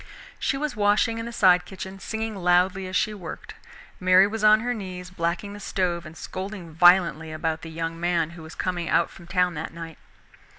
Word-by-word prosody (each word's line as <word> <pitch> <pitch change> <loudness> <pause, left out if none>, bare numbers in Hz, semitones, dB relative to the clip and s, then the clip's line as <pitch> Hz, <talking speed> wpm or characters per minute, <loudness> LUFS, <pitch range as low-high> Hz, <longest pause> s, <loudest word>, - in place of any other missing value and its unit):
She 275 - 0
was 295 -2 -3
washing 210 +2 +2
in 230 - -5
the - - -6
side 180 -5 +4
kitchen, 190 0 -8
singing 220 +2 -4
loudly 185 +1 +2
as 185 - -5
she 215 - +1
worked. 180 -6 -8 0.5
Mary 185 +1 +6
was 215 +1 -4
on 215 0 +6
her 245 +1 -1
knees, 185 -4 -7
blacking 170 +3 -2
the 205 - -9
stove 175 -4 -2
and 155 +1 -12
scolding 190 -3 -6
violently 170 -2 +4
about 160 0 -2
the 165 - -8
young 165 +1 -4
man 170 -2 0
who 170 -1 -11
was 160 +1 -11
coming 175 -2 -2
out 170 - +2
from 170 - -14
town 180 0 +1
that 160 +1 -6
night. 165 -1 -8
180 Hz, 200 wpm, -25 LUFS, 170-205 Hz, 0.5 s, Mary